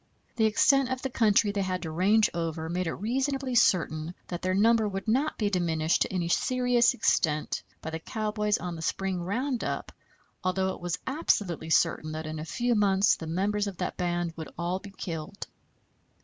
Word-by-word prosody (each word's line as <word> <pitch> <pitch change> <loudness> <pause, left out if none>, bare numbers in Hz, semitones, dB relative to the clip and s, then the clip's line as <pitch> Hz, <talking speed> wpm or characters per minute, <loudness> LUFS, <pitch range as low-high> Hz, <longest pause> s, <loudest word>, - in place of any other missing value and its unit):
The 225 -2 +3
extent 265 +5 +4
of 260 0 -3
the 265 - -2
country 215 -3 +3
they 200 -1 -1
had 185 -1 -2
to 160 - -4
range 200 +6 +4
over 165 -1 -3
made 180 +1 -1
it - - -2
reasonably 265 +5 -1
certain 170 -7 +2
that 175 -1 -4
their 185 0 0
number 220 +2 +4
would 195 +1 -5
not 270 +8 +1
be 205 -2 0
diminished 165 -3 +1
to - - +1
any 180 -3 -1
serious 245 +5 +2
extent 155 -9 +1 0.2
by 160 - -4
the 160 - -4
cowboys 210 +2 -1
on 180 -1 -5
the 160 - -7
spring 190 +2 -1
round 240 +8 -2
up, - - -3 0.5
although 190 +1 +1
it - - -11
was 175 -1 -2
absolutely 200 - 0
certain 155 -1 +2
that 155 0 -5
in 155 0 -5
a 155 - -5
few 240 +7 0
months 200 -2 +4
the 160 - -8
members 205 +5 0
of 195 -3 -6
that - - -3
band 175 -2 -1
would 160 -1 -7
all 175 +2 -1
be 200 - -10
killed. 170 -1 -6
190 Hz, 190 wpm, -28 LUFS, 170-220 Hz, 0.5 s, extent